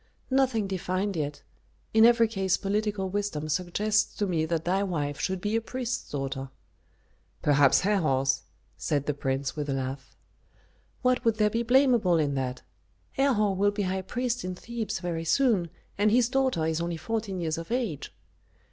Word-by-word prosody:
"Nothing 260 -5 +2
defined 190 +1 -2
yet. 150 -2 -3 0.5
In 220 0 +7
every 235 -1 +5
case 190 -4 0
political 205 -1 -1
wisdom 190 -6 -2
suggests 205 +6 0
to 205 - 0
me 165 -4 0
that 165 0 -1
thy 190 +3 +1
wife 150 -7 -2
should 190 0 -1
be 210 +4 -1
a 225 - +2
priest's 250 +1 -4
daughter." 135 -1 -4 0.9
"Perhaps 145 -2 +5
Herhor's?" 135 -10 +1 0.4
said 145 -3 -1
the 150 - 0
prince, 135 -1 -2
with 150 -1 -3
a - - +1
laugh. 135 0 -5 0.9
"What 255 -1 +2
would 230 -2 +3
there 210 -1 +2
be 230 - 0
blamable 240 -7 +4
in 145 -2 +1
that? 130 -2 -3 0.5
Herhor 225 -7 +2
will 200 +2 +3
be 205 0 -2
high 190 0 -1
priest 245 +4 -2
in 185 0 -4
Thebes 230 +3 -4
very 170 -2 -3
soon, 200 - +2 0.3
and 210 +1 +4
his 235 +1 +3
daughter 260 - +1
is 160 +1 0
only 170 0 -2
fourteen 215 -1 -3
years 165 -1 -2
of 165 +5 -8
age." 235 - -2
190 Hz, 165 wpm, -27 LUFS, 155-225 Hz, 0.9 s, In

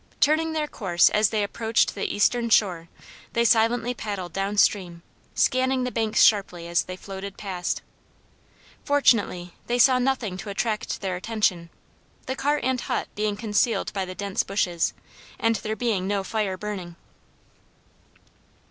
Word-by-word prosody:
Turning 315 +2 +2
their 310 -1 0
course 180 - +2
as 210 -1 +3
they 215 -2 0
approached 225 +2 +1
the 200 - -3
eastern 235 +3 +1
shore 180 -7 +2 0.4
they 235 0 +2
silently 230 +2 +3
paddled 200 -6 -5
down 195 +1 -2
stream, 175 -5 +2 0.3
scanning 260 0 +2
the 250 - -3
hanks 220 -2 +3
sharply 180 -5 +2
as 170 0 +2
they 185 - -6
floated 195 +1 -8
past. 185 -4 -3 1.0
Fortunately 210 - +2
they 240 - 0
saw 255 0 +5
nothing 250 -7 -1
to 205 - -7
attract 215 +2 -2
their 190 -2 -2
attention; 185 -4 -1 0.6
the 260 - -3
cart 290 +1 0
and 255 0 0
hut - - -2
being 210 -1 -1
concealed 220 +2 0
by 195 -2 -1
the 185 0 -7
dense 200 -1 -1
bushes, 180 -4 -1 0.4
and 225 -1 +1
there 215 +3 -4
being 220 -6 -1
no 200 -1 0
fire 195 -2 -2
burning. 185 -4 -6
210 Hz, 150 wpm, -25 LUFS, 190-235 Hz, 1.0 s, saw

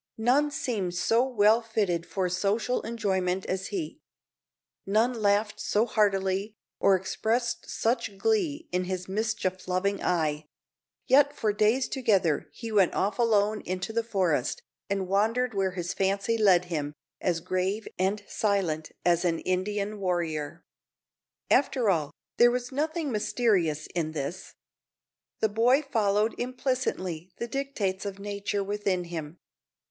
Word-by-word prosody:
None 255 +7 +3
seemed 205 -11 -2
so 225 +7 +3
well 225 -3 +4
fitted 200 -7 -1
for 190 -2 -1
social 200 +7 0
enjoyment 190 -5 -1
as 190 0 -2
he; 355 -6 -4 0.8
none 220 +5 +2
laughed 210 -1 +1
so 210 +2 +1
heartily, 200 -1 +1 0.2
or 195 -1 +5
expressed 225 +6 -1
such 225 -3 -1
glee 335 - 0
in 180 0 0
his 185 0 -4
mischief 195 -2 -2
loving 190 +2 0
eye; 155 -3 0 0.6
yet 285 +2 +5
for 215 -6 0
days 220 +5 +2
together 195 - +1
he 230 -2 -7
went 200 -4 +3
off 200 +3 0
alone 215 -2 +2
into 185 +4 -3
the 230 0 +1
forest, 185 - 0 0.3
and 195 -1 -1
wandered 225 +6 +1
where 190 -2 0
his 175 -1 -3
fancy 195 +3 0
led 190 -5 +4
him, 150 -4 -3 0.3
as 175 -2 +1
grave 185 +5 -2
and 200 +2 0
silent 180 -7 -1
as 175 0 +3
an 170 -2 +1
Indian 200 +3 -1
warrior. 170 -4 -2 0.9
After 250 -6 +3
all, 155 -5 0 0.3
there 240 - +7
was 245 +1 -2
nothing 310 +2 -1
mysterious 200 -8 +1
in 160 -3 -2
this. 140 -3 -5 0.9
The 220 - +3
boy 245 +7 +3
followed 215 -4 +1
implicitly 245 - -2
the 235 - -3
dictates 235 -8 -2
of 200 -1 -5
nature 200 0 -3
within 200 -2 -1
him. 165 -2 -6
200 Hz, 135 wpm, -28 LUFS, 185-230 Hz, 0.9 s, there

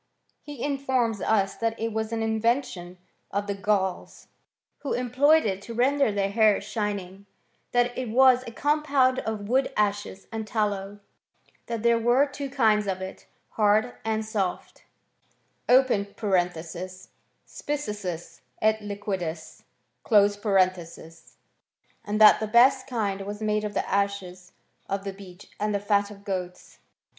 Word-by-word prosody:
He 290 -5 -8
in 280 -1 -1
forms 245 -6 0
us 195 -3 +1
that 230 0 -2
it 225 0 -2
was 220 0 -2
an 225 -1 -1
invention 220 -5 -1 0.3
of 200 +1 -2
the 200 - -2
Gauls, 195 -1 -2 0.5
who 285 - -3
employed 265 +5 +3
it 195 -2 -2
to 230 +3 -8
render 275 +1 +2
their 200 -1 -1
hair 215 -1 +4
shining; 200 -2 -4 0.4
that 245 0 +1
it 255 -3 -4
was 255 +2 +5
a - - -6
compound 280 -1 +2
of 215 -2 -4
wood 260 +4 +1
ashes 205 -2 -1
and 220 -1 -5
tallow, 205 -2 -2 0.7
that 230 -2 -4
there 235 0 +4
wen 250 +5 +3
two 280 -1 -5
kinds 220 -6 +2
of 190 -1 -2
it, 190 0 -8 0.2
hard 215 +3 +2
and 220 0 -1
soft 200 -4 -4 0.8
{spissus 185 -7 0 1.5
et 220 0 +2
liquidtis); 190 -6 -5 2.4
and 210 +1 -2
that 215 - +8
the 220 - -2
best 255 +3 +5
kind 205 -6 -2
was 205 +1 -6
made 215 0 0
of 210 -1 -4
the - - -1
ashes 190 -2 -2 0.4
of 195 0 -2
the 195 -1 -5
beech 190 -2 -14
and 210 0 0
the - - +1
fat 200 0 +1
of 200 -1 -13
goats. 180 -2 -6
210 Hz, 135 wpm, -26 LUFS, 200-240 Hz, 2.4 s, that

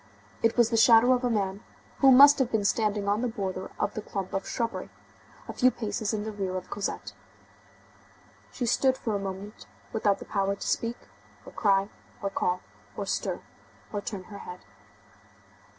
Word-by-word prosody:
It 230 +1 +2
was 235 -1 +4
the 230 - +2
shadow 235 +2 +7
of 250 0 0
a 245 - +2
man, 200 -2 -1 0.4
who 270 -1 +7
must 280 +3 +8
have 260 -2 +1
been 215 -2 0
standing 210 -1 +1
on 205 +2 +1
the 250 - 0
border 190 -4 -4
of - - 0
the 215 - -4
clump 195 -2 -5
of 195 - -2
shrubbery, 230 -1 -3 0.6
a - - -5
few 255 - +4
paces 220 -3 -3
in 215 -2 -2
the 220 - -4
rear 190 -3 -3
of 185 - -8
Cosette. 205 -1 -4 1.4
She 245 - -3
stood 260 +3 +2
for 220 - -3
a - - -1
moment 195 +1 -7 0.3
without 205 -3 +2
the - - -10
power 200 -1 0
to - - -6
speak, 230 +1 -1 0.5
or - - -10
cry, 195 -2 +2 0.3
or 200 -1 -3
call, 180 -1 0 0.4
or - - -3
stir, - - -2 0.5
or 205 - -2
turn 200 -2 -5
her 200 +1 -10
head. 180 0 -9
210 Hz, 180 wpm, -28 LUFS, 195-230 Hz, 1.4 s, must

